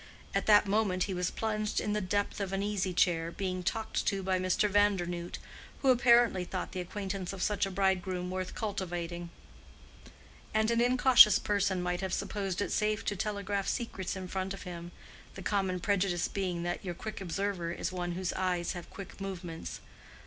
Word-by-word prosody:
At - - 0
that 210 -1 +7
moment 200 -3 +1
he 195 - -2
was 180 -1 0
plunged 215 -1 -1
in 210 - -1
the 210 - 0
depth 205 +3 -1
of 195 -1 -2
an 195 +1 0
easy 200 -2 -1
chair, 170 -2 +2
being 185 +1 -3
talked 220 +5 -1
to 195 -2 0
by 185 0 +1
Mr. 185 +3 +2
Vandernoodt, 185 -4 +1 0.5
who 265 - +6
apparently 240 -6 +5
thought 185 +1 -4
the 185 - -4
acquaintance 190 0 -4
of 190 - -3
such 205 -1 +1
a - - -4
bridegroom 185 -1 0
worth 185 0 -4
cultivating; 175 -4 -3 1.3
and 220 +1 +3
an 235 0 +3
incautious 245 -3 +7
person 200 -3 0
might 180 0 -1
have 190 -1 -2
supposed 195 -2 -2
it - - -4
safe 210 0 0
to 205 - 0
telegraph 200 0 -2
secrets 210 -7 -2
in 190 -1 -5
front 190 +1 -3
of - - -10
him, 175 -1 -7 0.4
the 195 - -7
common 190 -3 0
prejudice 190 -2 +1
being 180 -3 -2
that 175 0 -3
your 175 -3 -4
quick 215 +2 -6
observer 190 -1 -2
is 175 +1 -3
one 175 -1 -3
whose 180 0 -2
eyes 180 -2 0
have 175 -2 -7
quick 195 0 -10
movements. 180 -4 -6
190 Hz, 180 wpm, -31 LUFS, 180-205 Hz, 1.3 s, that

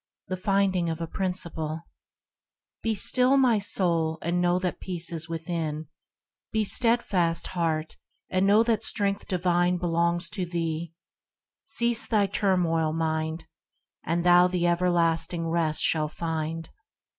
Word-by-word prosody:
THE 185 - -1
FINDING 190 -2 0
OF 160 - -4
A 165 - -3
PRINCIPLE 165 -3 -3 1.0
Be 225 -1 -1
still, 255 +6 +4
my 245 -5 +3
soul, 170 -5 +1
and 175 +2 0
know 175 0 +2
that 180 -1 -3
peace 175 -2 -2
is 165 0 -1
thine; 160 -2 -4 0.6
Be 220 -1 +1
steadfast, 200 -7 +2
heart, 160 -3 -2 0.3
and 185 +1 +1
know 210 +3 +5
that 230 -2 0
strength 200 -2 -1
divine 180 -1 +1
Belongs 170 0 0
to 195 -3 -3
thee; 165 -2 -3 0.7
cease 235 -1 +2
from 220 - +1
thy 205 - +3
turmoil, 175 -5 0
mind, 160 0 -2 0.6
And 170 +1 -1
thou 175 0 +6
the 180 -1 -1
everlasting 170 -1 +1
rest 165 -2 0
shalt 155 -1 +1
find. 165 0 -4
175 Hz, 135 wpm, -26 LUFS, 165-190 Hz, 1.0 s, thou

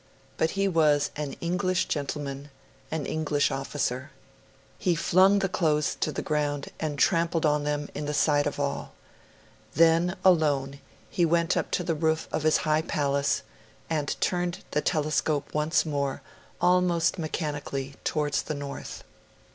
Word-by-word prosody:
But 160 +4 0
he 195 0 +2
was 155 -5 +3
an 150 -2 -4
English 180 +1 0
gentleman, 145 -1 -4 0.4
an 155 -3 -3
English 150 -2 0
officer. 135 0 -2 0.7
He 180 -4 +1
flung 185 +4 +4
the 195 -1 +1
clothes 155 -5 +1
to - - 0
the - - -4
ground, 145 -2 -1
and 150 -2 -2
trampled 165 0 +2
on 150 -1 +2
them 145 0 -1
in 145 0 -4
the 150 - -2
sight 145 -1 +3
of 145 - -4
all. 140 -1 -3 0.8
Then, 165 +3 +4
alone, 145 -6 +3 0.3
he 175 - +1
went 170 +1 +2
up - - -1
to 180 - -3
the 170 -1 0
roof 160 0 0
of - - -1
his 155 +1 +4
high 155 0 +3
palace, 140 -3 0 0.5
and 150 -3 -1
turned 175 -1 -1
the 150 - +1
telescope 155 -2 0
once 150 +2 +2
more, 140 -3 -2 0.4
almost 180 -1 +2
mechanically, 145 -4 -3
towards 150 -2 0
the 155 - -4
north. 140 -1 -7
155 Hz, 145 wpm, -27 LUFS, 145-170 Hz, 0.8 s, flung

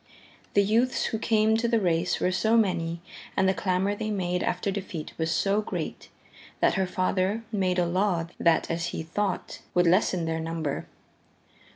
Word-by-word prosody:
The 200 - +6
youths 230 +5 +2
who 220 - -2
came 220 -1 +3
to 235 +1 0
the 230 -1 +2
race 175 -2 +1
were 180 - +1
so 220 +5 +2
many 170 -6 0 0.4
and 190 - +4
the 190 - +3
clamor 190 +1 0
they 215 +1 -3
made 180 -3 -1
after 180 +3 -1
defeat 190 -5 -5
was 160 0 0
so 200 +4 +2
great, - - -5 0.5
that - - +3
her 190 -1 0
father 185 +4 0
made 185 -4 0
a 175 - +3
law 180 -1 +1
that, 165 -1 +3
as 165 +1 -1
he - - -4
thought, 190 +4 -3 0.2
would 175 0 +4
lessen 180 -1 +3
their 160 0 -1
number. 160 -3 -3
185 Hz, 175 wpm, -27 LUFS, 170-205 Hz, 0.5 s, The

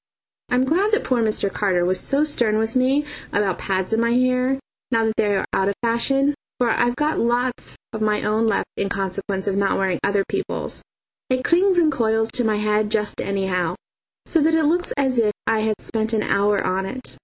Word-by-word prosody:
I'm 250 +1 +2
glad 375 +10 +1
that 440 +2 +2
poor 250 -2 +1
Mr. 215 -3 0
Carter 185 -4 +1
was 185 +1 +1
so 280 +2 +1
stern 240 -8 +1
with 220 +2 -1
me 265 +3 +2 0.3
about 200 -3 0
pads 190 +2 -1
in 225 - +2
my 235 0 +1
hair, 255 +2 +2 0.3
now 225 -2 +2
that 220 - 0
they 205 -2 +1
are - - -1
out 195 +1 +2
of 200 - -2
fashion, 270 +5 +2 0.3
for 245 -1 +2
I've 240 +2 +1
got 300 +3 0
lots 245 +1 0 0.2
of 220 - -5
my 210 -1 +1
own 220 +2 +1
left 225 - +1
in 195 - -1
consequence 195 0 -3
of 195 - 0
not 200 0 +1
wearing 190 -2 0
other 200 0 +2
people's. - - -2 0.5
It 255 0 0
clings 370 +2 +3
and 325 -3 +4
coils 225 -3 +1
to 245 - +1
my 215 -2 +1
head 210 0 +1
just 210 -1 0
anyhow, 190 -3 -1 0.5
so 325 - +2
that 320 +2 +3
it 320 - +2
looks 345 +4 +1
as 265 -3 +1
if 215 -2 +3 0.2
I 225 -1 +2
had 215 -1 -1
spent 220 0 -2
an 215 -1 +1
hour 200 0 +2
on 190 +1 0
it. 255 +4 -6
225 Hz, 210 wpm, -22 LUFS, 200-255 Hz, 0.5 s, and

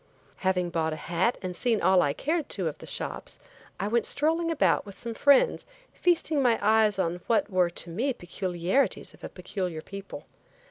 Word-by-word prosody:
Having 180 -2 0
bought 160 -1 0
a - - -3
hat 170 +9 0
and 180 -1 -4
seen 230 +1 +1
all 190 -2 +4
I 145 - +2
cared 310 - -2
to 185 -4 -1
of 155 - -5
the - - -9
shops - - -3 0.4
I 195 - -1
went 230 +1 +1
strolling 325 +3 +1
about 330 - +2
with 200 -2 -12
some 235 -1 -5
friends 285 - +4 0.3
feasting 330 -4 +1
my 240 -3 +3
eyes 215 -1 +3
on 175 -1 -1
what 225 -2 +1
were 180 -2 +3
to 170 0 -6
me 240 +11 0
peculiarities 185 +3 -1
of - - -20
a - - -5
peculiar 180 -3 -5
people. 195 0 -9
195 Hz, 185 wpm, -27 LUFS, 175-245 Hz, 0.4 s, all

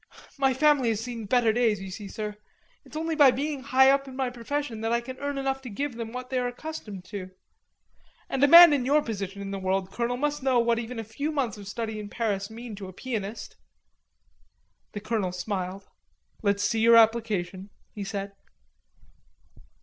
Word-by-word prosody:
My 270 -1 +4
family 285 -3 +4
has 220 -2 0
seen 230 -3 -6
better 235 -1 +3
days, 225 -4 +2
you 195 -1 -7
see, 200 +2 -7
sir. 210 +1 -5 0.5
It's - - -15
only 325 0 -1
by 290 -3 +7
being 280 +2 -2
high 265 0 +5
up 275 0 +1
in 260 - -9
my 260 -2 -1
profession 245 -1 -4
that 225 0 -1
I 235 - +3
can 255 +2 -9
earn 285 0 -3
enough 270 0 -1
to 255 - -8
give 270 +4 -3
them 230 -1 -5
what 250 +1 -7
they 260 - +1
are 250 - 0
accustomed 245 - -7
to. 190 -3 -6 1.0
And 270 - -1
a - - +7
man 335 +1 +10
in 275 -3 +1
your 290 +4 +3
position 200 -3 -5
in 195 - -6
the 195 - -4
world, 190 0 -1
Colonel, 240 +1 -2
must 295 +2 -1
know 260 -1 +2
what 235 -1 +2
even 235 +1 -6
a 225 - -3
few 280 +8 -4
months 250 -9 -2
of 200 - -10
study 220 +1 -4
in 205 -1 -7
Paris 200 -4 -2
mean 230 +1 -8
to 195 -2 -7
a 185 - -10
pianist." 215 -1 -5 1.4
The 205 - -5
colonel 215 -4 -1
smiled. 185 +1 -4 0.5
"Let's 200 -1 +1
see 225 +1 +1
your 230 +1 +6
application," 215 -5 +2 0.2
he 205 - -5
said. 195 0 -4
230 Hz, 195 wpm, -27 LUFS, 205-265 Hz, 1.4 s, man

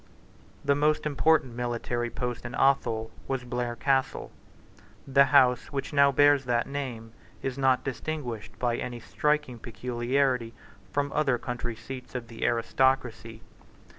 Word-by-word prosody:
The 140 - +4
most 150 +2 +1
important 150 -3 +2
military 120 0 -2
post 125 0 -4
in 120 0 -6
Athol 115 -5 +2 0.2
was 135 -2 -2
Blair 120 -1 -3
Castle. 135 +1 0 0.7
The 140 0 +5
house 130 -3 +4
which 140 0 -4
now 140 -1 +5
bears 145 0 +4
that 120 -1 +1
name 125 -5 -5 0.3
is 135 -2 -2
not 130 -1 +2
distinguished 130 -4 -5
by 120 -1 0
any 120 -1 -5
striking 150 0 -1
peculiarity 125 0 -1 0.4
from 145 0 -1
other 135 -5 +2
country 120 -1 -4
seats 125 +3 -9
of 120 -2 -5
the 115 -1 -7
aristocracy. 120 -1 0
125 Hz, 135 wpm, -28 LUFS, 120-140 Hz, 0.7 s, The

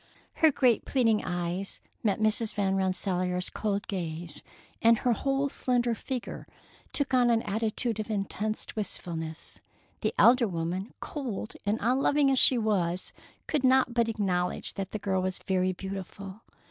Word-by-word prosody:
Her 320 -1 +5
great 250 -4 +3
pleading 225 -5 +2
eyes 175 +2 -2 0.2
met 210 -2 +1
Mrs. 215 +1 +1
Van 195 -2 +1
Rensselaer's 185 -1 0
cold 205 -2 -2
gaze, 170 -4 -4 0.4
and 230 0 +6
her 245 +1 +2
whole 275 +3 0
slender 245 -3 0
figure 250 +2 -5 0.4
took 285 -2 -1
an 240 -3 +4
attitude 220 +2 -1
of 215 - -4
intense 215 +1 -2
wistfulness. 165 -6 -5 0.4
The - - -1
elder 240 -1 +6
woman, 180 +3 -3
cold 245 -8 -5
and 210 +2 +2
unloving 275 +4 +3
as 265 - +3
she 255 - +6
was, 185 -6 0 0.3
could 295 -4 -1
not 260 -1 +4
but 235 -1 +2
acknowledge 180 -5 -1
that 195 -1 -4
the 215 - -4
girl 190 -2 0
was 185 0 -1
very 185 -1 0
beautiful. 195 +2 -7
210 Hz, 145 wpm, -28 LUFS, 185-240 Hz, 0.4 s, and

